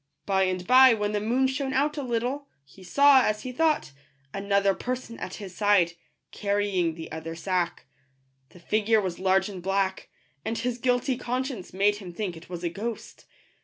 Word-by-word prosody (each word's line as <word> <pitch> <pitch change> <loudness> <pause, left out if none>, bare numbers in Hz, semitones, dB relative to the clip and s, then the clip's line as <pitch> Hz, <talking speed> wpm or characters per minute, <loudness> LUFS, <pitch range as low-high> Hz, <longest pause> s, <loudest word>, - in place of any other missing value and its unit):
By 190 -1 +2
and 185 -1 -2
by, 255 +1 +7
when 210 -1 -1
the 210 - 0
moon 245 +5 +1
shone 265 0 -1
out 290 +3 +1
a 295 - -3
little, 255 +3 -2 0.2
he 185 +7 -17
saw, 280 +7 +6
as 215 0 -1
he 255 - -5
thought, 310 - +1 0.4
another 200 0 +2
person 250 +1 -5
at 185 - -6
his 195 -3 -8
side, 205 -5 +3 0.4
carrying 200 -5 0
the 160 -1 -8
other 160 +1 -6
sack. 180 0 -2 0.6
The 180 - -16
figure 215 +4 +2
was 185 -4 -3
large 190 0 +2
and 195 -3 -7
black; 195 +1 -1 0.3
and 225 +1 -2
his 245 -1 -2
guilty 250 0 +1
conscience 250 -5 -4
made 205 +2 +2
him 190 -4 -9
think 185 -2 -4
it 165 +1 -13
was 175 -1 -6
a 170 - 0
ghost. 215 +6 -6
205 Hz, 180 wpm, -26 LUFS, 185-250 Hz, 0.6 s, by